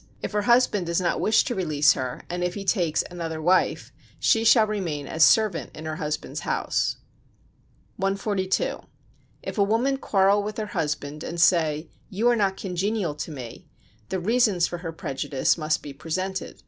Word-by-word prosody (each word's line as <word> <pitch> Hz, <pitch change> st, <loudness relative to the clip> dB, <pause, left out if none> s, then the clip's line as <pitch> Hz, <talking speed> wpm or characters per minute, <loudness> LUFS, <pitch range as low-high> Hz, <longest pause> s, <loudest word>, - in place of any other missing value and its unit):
If -, -, -3 dB
her 210 Hz, 0 st, 0 dB
husband 235 Hz, -5 st, +3 dB
does 170 Hz, +1 st, +1 dB
not 175 Hz, -2 st, 0 dB
wish 220 Hz, -, +4 dB
to 250 Hz, -, -2 dB
release 155 Hz, -6 st, +3 dB
her, 130 Hz, -1 st, -5 dB
and 175 Hz, 0 st, -3 dB
if 180 Hz, 0 st, -1 dB
he 200 Hz, -1 st, -6 dB
take 175 Hz, -6 st, +1 dB
another 165 Hz, -2 st, -5 dB
wife, 180 Hz, +4 st, +1 dB, 0.3 s
she 225 Hz, -, +3 dB
shall 225 Hz, -1 st, +6 dB
remain 180 Hz, -9 st, -3 dB
as 160 Hz, +2 st, +2 dB
servant 215 Hz, -4 st, +3 dB
in 155 Hz, -, -8 dB
her 155 Hz, 0 st, -4 dB
husband's 150 Hz, -3 st, -4 dB
house. -, -, -1 dB, 1.0 s
142. 195 Hz, -1 st, -1 dB, 0.6 s
If -, -, -5 dB
a -, -, +6 dB
woman 235 Hz, +7 st, +1 dB
quarrel 200 Hz, -4 st, +3 dB
with 210 Hz, +1 st, -5 dB
her 215 Hz, -, -2 dB
husband, 150 Hz, -2 st, -3 dB
and 170 Hz, -, -5 dB
say: 165 Hz, -2 st, +2 dB, 0.2 s
"You 220 Hz, +3 st, 0 dB
are 240 Hz, -, +4 dB
not 195 Hz, -3 st, 0 dB
congenial 190 Hz, -1 st, -2 dB
to 150 Hz, +3 st, -6 dB
me," 130 Hz, -6 st, -9 dB, 0.4 s
the 190 Hz, -, -1 dB
reasons 210 Hz, -2 st, +2 dB
for 175 Hz, -, -5 dB
her 165 Hz, -1 st, -5 dB
prejudice 135 Hz, -3 st, -1 dB
must 155 Hz, -2 st, -1 dB
be 145 Hz, -, -7 dB
presented. 185 Hz, +6 st, -4 dB
180 Hz, 175 wpm, -25 LUFS, 155-205 Hz, 1.0 s, shall